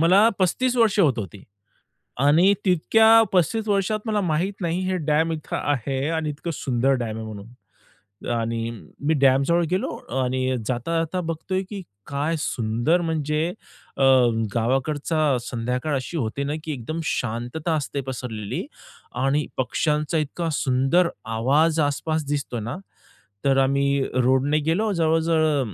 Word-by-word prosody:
मला 190 +7 +6
35 245 +8 +1
वर्षे 215 -4 +4
होत 135 -7 +2
होती, 100 -1 -6 0.8
आणि 165 +8 +5
तितक्या 220 +6 +5
35 215 +5 +1
वर्षात 205 +1 +1
मला 210 -2 0
माहीत 175 +3 0
नाही, 170 +1 -1
हे 185 - 0
डॅम 160 +2 +2
इथं 155 -2 -5
आहे, 135 0 -1
आणि 160 -2 -1
इतकं 155 +3 -5
सुंदर 130 0 +1
डॅम 110 -1 -4
आहे 110 - -6
म्हणून. 105 0 -9 0.8
आणि 115 0 -1 0.3
मी 150 +3 +1
डॅमजवळ 140 +6 +4
गेलो, 185 - 0 0.4
आणि 130 0 0
जाता-जाता 165 +8 -1
बघतोय, 175 +3 -3
की 200 -2 -6 0.3
काय 145 +4 -1
सुंदर, 120 +9 0
म्हणजे 155 0 -1 0.5
अ, - - +1 0.5
गावाकडचा 140 +4 +1
संध्याकाळ 125 +5 -2
अशी 135 +6 -4
होते 130 +2 -2
ना, 145 - -2
की 155 - -4
एकदम 150 +6 -5
शांतता 125 +6 -2
असते 140 -2 -3
पसरलेली 115 -5 -4 0.6
आणि 145 +2 +1
पक्ष्यांचा 150 +4 0
इतका 160 +3 -2
सुंदर 140 +6 +2 0.3
आवाज 155 +7 +3
आस-पास 150 +2 -1
दिसतोय 140 -5 -2
ना. 120 +10 -4 0.7
तर 135 -1 +3
आम्ही 140 +1 +2
रोडने 130 +4 +2
गेलो, 210 +6 +1
जवळ-जवळ 160 - +1
150 Hz, 135 wpm, -23 LUFS, 130-165 Hz, 0.8 s, मला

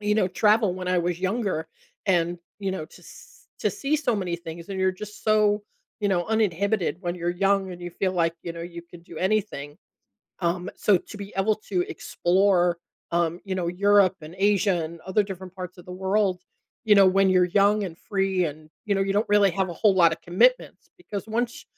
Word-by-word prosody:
you 210 0 +1
know 190 -4 +2
travel 210 +2 +3
when 185 -1 -6
I 180 -1 +2
was 175 0 -1
younger 190 -4 -1 0.4
and, 175 -2 +1 0.2
you 195 -1 -1
know, 185 -5 -4
to - - -17
s - - -16
to - - +1
see 305 -5 -1
so 260 -6 0
many 180 -4 -2
things, 170 +1 -9
and 195 -1 -4
you're 190 0 +2
just 210 +2 -10
so, 210 -1 +3 0.4
you 205 - +1
know, 175 -3 +1
uninhibited 200 -4 0
when 175 -2 -3
you're 175 0 -1
young, 195 +1 +1
and 180 - -10
you 175 - -5
feel 185 +2 -1
like, 165 -2 +1
you 170 - -4
know, 170 - -8
you 170 0 -8
could 170 -1 -13
do 170 - -13
anything, 190 -8 -1 0.6
um, 175 +2 -1
so 200 -4 +3
to 210 - -12
be 200 0 -8
able 210 +3 +2 0.2
to 180 -2 +2
explore, 180 -1 +1 0.3
um, 170 0 +1
you 195 -2 -3
know, 180 -2 -1
Europe 200 +1 +4
and 155 +3 -10
Asia 195 -3 +2
and 165 +1 -8
other 190 +3 +1
different 190 -2 -8
parts 180 -1 -8
of 175 - -12
the 180 - -9
world, 190 -1 0 0.4
you 215 - +6
know, 195 -1 +7
when 195 +1 +4
you're 185 -1 +5
young 200 +3 +3
and 165 -3 -6
free 195 -2 0
and, 155 +1 -8 0.2
you 205 - +1
know, - - 0
you 195 0 0
don't 210 +3 0
really 205 -1 +5
have 190 +1 0
a - - -4
whole 205 +2 +3
lotta 170 -3 +4
commitments, 190 - +1
because 210 - -7
once 235 +2 -2
190 Hz, 210 wpm, -25 LUFS, 175-205 Hz, 0.6 s, know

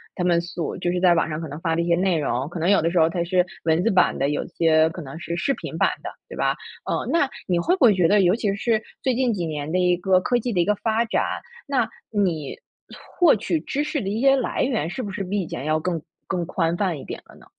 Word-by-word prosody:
他 180 - -2
们 175 -1 +3
所 170 -1 -5
就 180 - -1
是 180 - -1
在 180 -2 +6
网 165 - +1
上 155 +1 -4
可 160 - -5
能 145 +2 -7
发 165 -2 0
的 170 - +1
一 - - -1
些 170 - +4
内 185 -2 +2
容， 135 -2 -1
可 175 - -6
能 170 - +2
有 200 - +5
的 165 +1 0
时 180 - -1
候 160 0 +5
它 170 0 -1
是 180 0 +2 0.2
文 165 +1 +2
字 230 - +2
版 185 -2 +3
的， 140 - +1
有 145 - -2
些 160 -2 +3
可 170 +2 -8
能 140 +1 -8
是 170 -1 -4
视 275 - +1
频 - - -7
版 - - +3
的， - - -4 0.2
对 - - -8
吧？ - - +1 0.3
嗯， - - -1
那 325 -5 +2 0.2
你 175 -3 +1
会 355 - +2
不 380 - 0
会 220 - +7
觉 180 -3 +3
得 205 +3 +4
尤 180 +1 +4
其 205 -4 0
是 220 +1 +1 0.2
最 260 -2 +1
近 250 -1 +1
几 180 -5 -2
年 150 -1 -4
的 185 - +2
一 180 -1 +3
个 185 +1 +3
科 245 +5 +1
技 240 0 -3
的 180 - 0
一 - - +1
个 210 - +2
发 225 +2 0
展， 225 - 0 0.4
那 270 -5 +1 0.2
你 175 -9 -1 0.6
获 350 -3 +6
取 270 +10 -1
知 290 +2 -2
识 300 -2 -2
的 195 - -3
一 210 +3 -2
些 270 +2 +5
来 260 -3 -1
源， 235 - 0
是 215 +9 -4
不 205 - -5
是 195 - -3
比 200 +2 -2
以 175 - -5
前 - - -5
要 155 +1 +1
更 170 0 -2 0.3
更 180 -2 -2
宽 165 -1 0
泛 180 -5 -1
一 - - -10
点 - - -7
了 - - -17
呢？ - - -18
180 Hz, 305 characters per minute, -23 LUFS, 165-215 Hz, 0.6 s, 会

